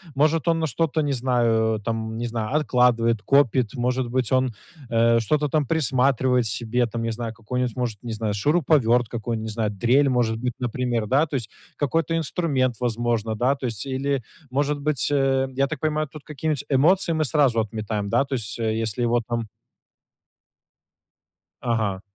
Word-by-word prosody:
может 155 +3 +2
он 165 -1 +3
на 160 - 0
что-то, 160 +2 0
не 145 -1 0
знаю, 115 -3 +1
там 110 -1 -3
не 120 - -3
знаю, 115 +3 -3
откладывает, 120 -6 +2
копит, 130 -3 +2
может 125 0 -1
быть, 125 -1 -1
он, 130 -1 +2 0.4
э, 115 0 +3
что-то 150 +5 0
там 150 -2 +1
присматривает 130 -4 +2
себе, 120 +3 -1
там 115 +1 -4
не 115 - -1
знаю, 115 0 -4
какой-нибудь, 125 +1 -3
может, 120 -5 -3
не 120 -2 -5
знаю, 110 -1 -2
шуруповерт, 125 - +2
какую, 115 0 -3
не 110 0 -5
знаю, 110 -1 -1
дрель, 125 +7 +2
может 120 -3 +1
быть, 125 0 -2
например, 120 -2 -1
да. 140 +8 +2
То 145 - -5
есть 115 -6 -4 0.3
какой-то 165 +3 0
инструмент, 140 -6 0
возможно, 115 -2 -1
да, 130 +5 +2
то 130 - -4
есть 115 +2 -5
или, 135 +1 -1 0.3
может 145 +2 0
быть, 145 -2 0
эм, 135 -1 +1
я 140 +1 +2
так 150 -1 -5
понимаю, 155 -1 0
тут 150 +1 -12
какие-нибудь 150 -1 -3
эмоции 165 +7 +3
мы 155 -1 +1
сразу 135 -5 +2
отметаем, 105 -1 -3
да, 135 - +3
то 135 - -6
есть 110 -5 -3
если 110 0 -2
его 120 0 +2
там 115 -2 -2 2.2
Ага. 110 -6 -1
125 Hz, 170 wpm, -24 LUFS, 115-140 Hz, 2.2 s, он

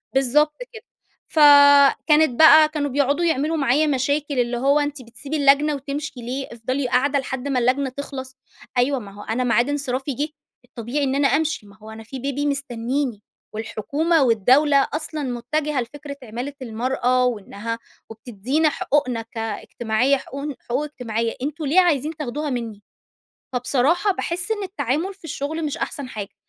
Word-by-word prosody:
بالضبط 295 +3 +3 0.2
كده. 445 +1 -10 0.4
فكانت 285 -1 +6
بقى 315 -1 +8
كانوا 295 -2 -2
بيقعدوا 285 +5 +1
يعملوا 320 0 0
معايا 285 +2 +2
مشاكل، 285 0 0
اللي 240 0 0
هو 280 +4 +3
أنتِ 290 -2 -3
بتسيبي 275 +6 -6
اللجنة 285 +1 +4
وتمشي 280 +2 -5
ليه! 255 +3 -4
افضلي 255 +3 -2
قاعدة 280 +3 +2
لحد 265 0 -5
ما 265 -3 +1
اللجنة 260 +3 +1
تخلص؟ 265 -1 -7 0.4
أيوه 260 +2 +2
ما 200 -3 -10
هو 205 +1 -11
أنا 245 +3 -1
معاد 240 +2 +2
انصرافي 275 -1 -2
جِه 295 +5 -2 0.4
الطبيعي 250 +4 -4
إن 270 0 0
أنا 280 0 +3
أمشي، 300 -7 0
ما 200 +2 -17
هو 215 0 -13
أنا 220 0 -10
في 260 +4 -8
بيبي 280 +2 -2
مستنّيني. 260 -3 -2 0.3
والحكومة 280 - 0
والدولة 265 +5 +4
أصلًا 305 -1 -4
مُتَّجِهة 265 +3 -2
لفكرة 280 +3 -8
عِمالة 245 +5 -6
المرأة 250 +2 0
وإنّها 230 0 -4 0.3
وبتدّينا 240 +7 -1
حقوقنا 260 -5 0
كاجتماعية 225 +3 -1
حقوقن 280 +2 -6
حقوق 255 +5 0
اجتماعية، 230 -6 -3
أنتم 300 +3 -4
ليه 320 +7 +4
عايزين 310 -2 0
تاخدوها 295 +1 -3
منّي؟ 225 -5 -5 0.7
فبصراحة 275 - +1
باحس 350 +3 -3
إن 415 -2 -1
التعامل 345 - -2
في 380 -2 -28
الشغل 315 +1 -4
مش 290 - -3
أحسن 280 -3 -4
حاجة. 205 -4 -7
275 Hz, 150 wpm, -22 LUFS, 245-295 Hz, 0.7 s, بقى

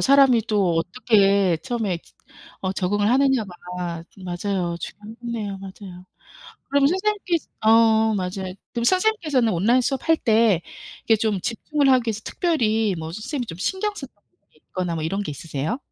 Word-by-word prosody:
사람이 270 -4 +5
또 200 -6 +2
어떻게 195 0 +3
처음에 225 -8 -2
저 - - -25 0.4
어 190 -1 -1
적응을 205 +3 +1
하느냐가 260 -5 +2 0.7
맞아요. 180 -1 -2
중요하겠네요. 220 -1 -6
맞아요. 190 -2 -10 0.7
그럼 280 0 +4
선생님께서 375 -1 0 0.2
어 220 0 +5
맞아요. 185 -1 -3 0.2
그럼 235 -1 -2
선생님께서는 335 - +2
온라인 215 +9 +3
수업할 280 +6 +1
때 220 -6 +3 0.5
이렇게 225 - +5
좀 215 -3 0
집중을 275 - 0
하기 250 -3 +3
위해서 220 -1 -2
특별히 225 - +1
뭐 160 0 -6
선생님이 245 - -4
좀 165 - -7
신경 385 - -1
쓰는 270 -9 -8
부분이 205 - -38
있거나 180 -2 -2
뭐 160 - -3
이런 195 +5 -1
게 160 - -5
있으세요? 150 - -4
220 Hz, 360 characters per minute, -23 LUFS, 190-260 Hz, 0.7 s, 사람이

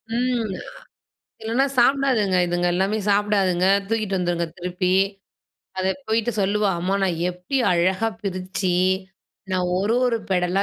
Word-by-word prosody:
ம். 240 -4 0 0.9
இல்லனா, 235 +5 +1
சாப்பிடாதுங்க. 240 -7 +3
இதுங்க 175 0 0
எல்லாமே 195 +4 0
சாப்பிடாதுங்க. 200 -3 +2 0.2
தூக்கிட்டு 215 -4 -1
வந்துருங்க 175 -1 -1
திருப்பி. 180 +1 -1 0.9
அதை 190 0 +1 0.2
போயிட்டு 225 +1 +1
சொல்லுவா, 200 +1 +1
"அம்மா 185 +3 -1
நான் 175 -4 0
எப்படி 180 +10 -4 0.2
அழகா 185 +5 +1
பிருச்சு, 185 -1 -2 0.8
நான் 180 -1 0
ஒரு 205 +4 +1
ஒரு 235 -2 +1
பெடலா 180 +1 +1
190 Hz, 120 wpm, -23 LUFS, 180-220 Hz, 0.9 s, சாப்பிடாதுங்க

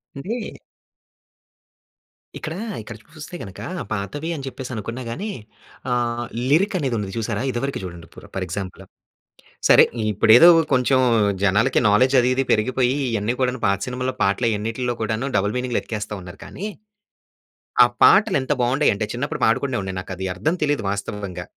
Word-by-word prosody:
అంటే 215 - -5 1.8
ఇక్కడ 155 - -5 0.3
ఇక్కడ 110 +2 -9 0.2
చూస్తే 155 +3 -9
గనక, 95 -2 -10 0.3
పాతవి 110 - -3
అని 140 -3 -6
చెప్పేసి 130 -1 -7
అనుకున్నా 115 +4 -5
గాని, 195 - -4 0.6
ఆహ్, 120 -1 -1 0.2
లిరిక్ 190 +8 +3
అనేది 135 -6 -1
ఉంది 100 -2 -4
చూసారా, 115 -1 -2
ఇదివరకు 135 +3 -3
చూడండి 85 -2 -8
ఇప్పుడు - - -14
ఫర్ 95 -1 -2
ఎగ్జాంపుల్ 95 +1 -6 0.9
సరే, - - +8 0.3
ఇప్పుడేదో 110 - +7 0.2
కొంచెం 130 0 +3 0.4
జనాలకి 105 +6 +3
నాలెడ్జ్ 125 +6 +4
అది 125 +1 +2
ఇది 135 +1 +1
పెరిగిపోయి 125 +4 +1 0.2
ఇవన్నీ 110 +2 0
కూడాను, 130 -1 0
పాత 100 0 +2
సినిమాల్లో 125 +1 -3
పాటలన్నిటిలో 115 +4 0
కూడాను 110 +4 -1
డబుల్ 105 +2 0
మీనింగులేఎతికేస్తా 115 -4 -3
ఉన్నారు. 90 +2 -11
కానీ, 200 - -7 1.2
ఆ - - +7 0.2
పాటలు 205 -3 +6
ఎంత 130 +3 0
బాగుండేవి 130 +3 +2
అంటే, 105 +1 -3
చిన్నప్పుడు 125 +4 -4
పాడుకునే 125 +3 +1
ఉండే 95 0 -4
నాకు 95 - -8
అది 95 +1 -3
అర్థం 155 - 0
తెలియదు 145 -7 0
వాస్తవంగా. 100 -3 -5
120 Hz, 140 wpm, -22 LUFS, 105-130 Hz, 1.8 s, సరే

